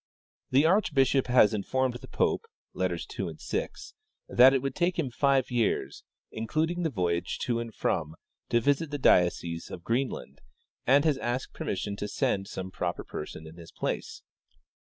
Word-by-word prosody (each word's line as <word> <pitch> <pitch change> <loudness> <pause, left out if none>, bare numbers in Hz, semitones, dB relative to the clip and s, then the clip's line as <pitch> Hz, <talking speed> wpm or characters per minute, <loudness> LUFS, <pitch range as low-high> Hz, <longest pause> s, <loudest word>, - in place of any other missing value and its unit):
" - - -83
The 135 +4 +4
archbishop 140 -8 +3
has 125 -4 +5
informed 130 +5 0
the 120 - -9
pope 460 - 0 0.3
(letters - - -2
2, - - -5
6) - - -4 0.4
that 130 +2 +7
it 135 - +2
would 135 -1 -1
take 175 +4 0
him 145 -7 -1
five 135 0 +2
years, 110 - 0 0.3
including 155 +10 -1
the 165 - +1
voyage 90 - -1
to 120 -3 0
and 115 -1 -5
from, 80 -6 -1 0.3
to 120 - +3
visit 145 +6 +1
the 145 - -3
diocese 85 -7 +2
of 85 - -8
Greenland, 115 - -2 0.5
and 140 +4 +5
has 150 -4 +2
asked 120 +1 -3
permission 100 +1 -3
to 105 - -3
send 95 -1 -1
some 95 -2 -6
proj^er 85 -2 -3
person 75 +1 -7
in 80 +2 -12
his 85 -1 -12
place. - - -4
120 Hz, 165 wpm, -28 LUFS, 95-140 Hz, 0.5 s, that